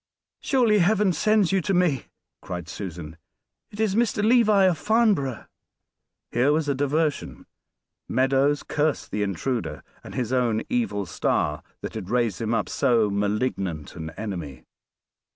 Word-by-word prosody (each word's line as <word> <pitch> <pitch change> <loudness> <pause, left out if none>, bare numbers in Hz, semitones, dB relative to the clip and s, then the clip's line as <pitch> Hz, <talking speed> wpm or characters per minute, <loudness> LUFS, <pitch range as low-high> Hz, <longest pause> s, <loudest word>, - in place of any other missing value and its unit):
"Surely 240 -6 +3
Heaven 200 +1 +3
sends 210 +2 +2
you 195 -1 +2
to 195 +3 0
me," 175 -8 +1 0.4
cried 90 -2 -6
Susan. 85 -4 -7 0.5
"It 210 - -12
is 220 -3 +1
Mr. 220 -1 +1
Levi, 220 -4 +5
of 180 -4 +3
Farnborough." 210 - +1 0.9
Here 125 +4 +3
was 155 0 +1
a 140 - +2
diversion. 145 +2 -1 0.6
Meadows 135 +2 +2
cursed 150 -1 -1
the 105 - -2
intruder, 100 -1 -2 0.2
and - - -10
his 125 -1 -2
own 120 -4 +1
evil 230 - 0
star 75 -2 -1 0.2
that - - -6
had 105 -5 -6
raised 120 -5 0
him 110 0 -1
up 110 - -1
so 115 -4 +2
malignant 100 - -2
an 80 -2 -6
enemy. 85 -11 -6
130 Hz, 140 wpm, -25 LUFS, -, 0.9 s, Levi